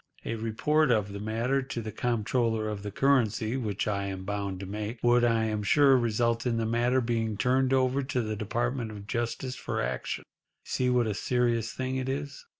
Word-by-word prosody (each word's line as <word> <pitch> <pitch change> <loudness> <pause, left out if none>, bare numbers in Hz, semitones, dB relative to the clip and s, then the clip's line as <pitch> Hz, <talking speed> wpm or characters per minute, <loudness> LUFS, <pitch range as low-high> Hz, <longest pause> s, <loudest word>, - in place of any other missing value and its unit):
A - - -2
report 115 +7 +1
of 105 -4 +1
the 100 - -5
matter 115 +6 0
to 130 -2 -5
the 110 -1 -5
Comptroller 115 -1 0
of 105 -2 -4
the 105 - -5
Currency—which 115 -3 +1
I 100 -1 -1
am 95 -1 -5
bound 100 -1 -3
to - - -5
make—would, 115 +4 +1
I 115 -1 +3
am 110 -1 -1
sure, 135 +6 +5
result 115 0 +1
in 115 -1 +1
the 115 - 0
matter 120 +3 +2
being 115 -3 -1
turned 130 +3 +2
over 130 +1 +2
to 130 -2 -1
the 110 0 -3
Department 120 +4 -2
of 105 -2 -9
Justice 120 +3 -3
for - - -3
action. - - -2 0.4
You - - -19
see 125 -1 +1
what 125 -1 +3
a 110 - -1
serious 115 0 0
thing 130 +3 -3
it 130 0 -2
is." 140 +1 -4
115 Hz, 195 wpm, -28 LUFS, 110-125 Hz, 0.4 s, sure